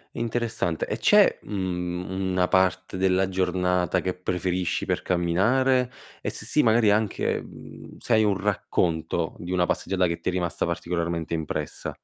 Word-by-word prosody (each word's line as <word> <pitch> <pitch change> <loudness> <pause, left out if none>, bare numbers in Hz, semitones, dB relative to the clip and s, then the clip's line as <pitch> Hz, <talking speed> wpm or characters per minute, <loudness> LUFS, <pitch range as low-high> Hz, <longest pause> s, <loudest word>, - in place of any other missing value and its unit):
Interessante. 115 -8 -1
E - - -3
c'è, - - +5
mhmm, 90 -3 -3 0.2
una 90 -1 +2
parte 95 0 +1
della 95 0 +2
giornata 90 -1 +1
che 90 +1 -2
preferisci 90 0 -2
per - - -1
camminare? 120 +9 +2 0.3
E - - -2
se - - -5
sì, 150 - +3
magari 110 -3 +4
anche, 105 -1 0
mhmm, - - -12
se 120 - -1
hai 110 0 +5
un 100 -2 +2
racconto 85 -4 -1
di 85 +1 -6
una 90 -1 +2
passeggiata 95 +1 0
che 85 -1 -2
ti 85 - -2
è - - 0
rimasta 90 -2 -1
particolarmente 85 -1 -2
impressa. 75 -2 -3
90 Hz, 155 wpm, -25 LUFS, 90-100 Hz, 0.3 s, c'è